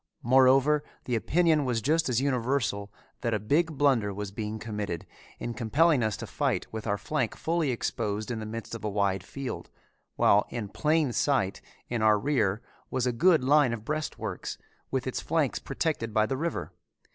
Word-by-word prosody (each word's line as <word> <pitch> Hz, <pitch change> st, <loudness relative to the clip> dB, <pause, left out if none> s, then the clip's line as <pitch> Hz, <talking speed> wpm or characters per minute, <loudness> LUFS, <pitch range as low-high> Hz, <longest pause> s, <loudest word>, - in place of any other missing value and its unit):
Moreover 135 Hz, +4 st, +5 dB, 0.2 s
the 125 Hz, -, -2 dB
opinion 155 Hz, -, +3 dB
was 125 Hz, -3 st, 0 dB
just 155 Hz, +6 st, +1 dB
as 120 Hz, -2 st, +2 dB
universal 125 Hz, -6 st, 0 dB, 0.3 s
that 115 Hz, -2 st, 0 dB
a -, -, -1 dB
big 150 Hz, -, +1 dB
blunder 130 Hz, -8 st, +3 dB
was 100 Hz, 0 st, -5 dB
being 105 Hz, +1 st, -4 dB
committed 105 Hz, -6 st, -4 dB, 0.3 s
in 120 Hz, -, -4 dB
compelling 140 Hz, +7 st, +3 dB
us 110 Hz, -3 st, 0 dB
to -, -, -6 dB
fight -, -, -1 dB
with 110 Hz, 0 st, -5 dB
our 100 Hz, 0 st, +1 dB
flank 125 Hz, +2 st, -2 dB
fully 165 Hz, -2 st, 0 dB
exposed 110 Hz, -2 st, -2 dB
in 115 Hz, -, -3 dB
the 110 Hz, -, -5 dB
midst 115 Hz, +1 st, -6 dB
of 115 Hz, -, -6 dB
a 105 Hz, -, -1 dB
wide 100 Hz, -2 st, 0 dB
field, 135 Hz, +6 st, -6 dB, 0.5 s
while 100 Hz, +1 st, +4 dB
in 110 Hz, -4 st, -4 dB
plain 150 Hz, +1 st, +1 dB
sight 130 Hz, -10 st, +1 dB, 0.3 s
in 120 Hz, -2 st, -2 dB
our 110 Hz, -1 st, +5 dB
rear 110 Hz, -4 st, 0 dB, 0.3 s
was 130 Hz, -1 st, 0 dB
a 125 Hz, -, +2 dB
good 160 Hz, +4 st, +4 dB
line 140 Hz, -2 st, +4 dB
of 110 Hz, -2 st, -6 dB
breastworks 155 Hz, +2 st, -4 dB, 0.3 s
with -, -, -1 dB
its -, -, -2 dB
flank -, -, 0 dB
protected 115 Hz, -9 st, -2 dB
by 110 Hz, 0 st, +4 dB
the 120 Hz, -, -2 dB
river. 135 Hz, -, -3 dB
120 Hz, 180 wpm, -28 LUFS, 105-145 Hz, 0.5 s, Moreover